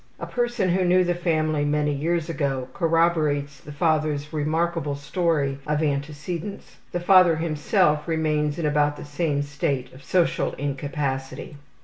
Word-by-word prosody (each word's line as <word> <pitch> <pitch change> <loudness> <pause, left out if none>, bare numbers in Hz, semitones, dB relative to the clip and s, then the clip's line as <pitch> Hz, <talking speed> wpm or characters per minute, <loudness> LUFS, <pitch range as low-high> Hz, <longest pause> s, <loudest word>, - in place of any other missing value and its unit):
A - - -4
person 240 -5 -1
who 185 +2 +2
knew 180 +1 +4
the 175 0 +1
family 155 -3 0
many 150 0 +1
years 165 +3 -1
ago 140 -5 -2
corroborates 160 -5 +1
the 150 - -11
father's 150 -1 0
remarkable 155 0 -1
story 140 -2 -1
of 150 +1 0
antecedents. 150 +6 -4
The 175 - -1
father 180 -2 +6
himself 155 0 +1
remains 155 -2 0
in 170 - -2
about 145 0 +2
the - - -8
same 145 -1 -1
state 140 -2 -2
of 130 +2 -14
social 175 +3 +1
incapacity. 140 0 -4
150 Hz, 140 wpm, -24 LUFS, 145-170 Hz, -, father